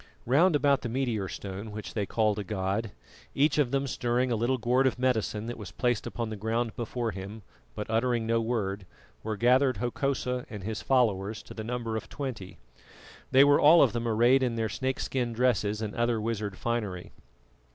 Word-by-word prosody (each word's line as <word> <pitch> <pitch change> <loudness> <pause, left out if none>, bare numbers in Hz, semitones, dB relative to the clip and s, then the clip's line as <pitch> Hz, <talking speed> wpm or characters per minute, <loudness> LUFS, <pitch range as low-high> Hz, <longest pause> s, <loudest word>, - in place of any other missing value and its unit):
Round 155 +8 +4
about 140 -1 +3
the 120 - -4
meteor 115 -5 -1
stone 100 +3 -6
which 105 0 -7
they 105 -3 -2
called 110 -2 +1
a - - -3
god, 100 +2 -2 0.5
each 145 +2 +3
of 140 -5 +3
them 135 +1 0
stirring 125 -1 0
a - - +2
little 120 +4 +1
gourd 125 +3 +2
of 130 - -1
medicine 115 -4 0
that 120 0 -6
was 105 - -7
placed 120 -4 -1
upon 115 -2 -4
the - - -3
ground 110 +2 -2
before 120 0 -3
him, 100 +2 -8 0.3
but 105 - -4
uttering 115 +1 +1
no 115 0 +1
word, 100 -5 -2 0.3
were 110 -1 -3
gathered 125 +3 +3
Hokosa 125 0 -1
and 105 -4 -7
his 110 +2 -4
followers 110 -5 +1
to - - -11
the 110 - -6
number 115 -1 -3
of 110 - -5
twenty. 125 -10 -6 0.7
They 135 +1 +7
were 145 0 +5
all 160 +3 +8
of 125 -6 +2
them 120 0 -2
arrayed 120 +4 +4
in 125 -3 0
their 110 -1 -1
snakeskin 125 +1 -2
dresses 110 -3 +1
and 105 -1 -4
other 120 -1 0
wizard 105 -3 -3
finery. 105 -7 -3
115 Hz, 190 wpm, -28 LUFS, 105-125 Hz, 0.7 s, all